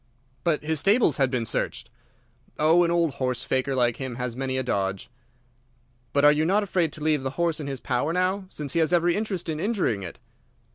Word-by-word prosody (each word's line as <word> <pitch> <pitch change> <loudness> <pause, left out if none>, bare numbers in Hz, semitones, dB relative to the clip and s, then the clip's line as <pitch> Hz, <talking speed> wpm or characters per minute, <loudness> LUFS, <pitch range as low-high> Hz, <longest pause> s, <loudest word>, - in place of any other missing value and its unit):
"But 155 -3 +1
his 160 0 0
stables 200 - +3
had 135 -2 +2
been 125 -3 -1
searched?" 115 - -3 0.7
"Oh, 160 +3 +4
an 170 - +1
old 170 -3 +1
horse 125 -1 -1
faker 130 +1 -1
like 120 -2 +1
him 130 -3 -5
has 125 -1 -3
many 130 0 -2
a 130 - 0
dodge." 100 -3 -2 1.0
"But 140 +3 +3
are 150 - +8
you 150 +1 +1
not 200 +6 +2
afraid 175 -5 0
to 150 - -4
leave 155 -2 +2
the 135 - -2
horse 170 -2 0
in 145 - -5
his 135 -2 -4
power 130 +5 -1
now, 185 +2 0
since 145 -6 -5
he 170 - +1
has 160 0 +2
every 175 0 +3
interest 205 -5 -3
in 155 -2 -3
injuring 190 - 0
it?" 90 -3 -7
150 Hz, 210 wpm, -25 LUFS, 130-170 Hz, 1.0 s, are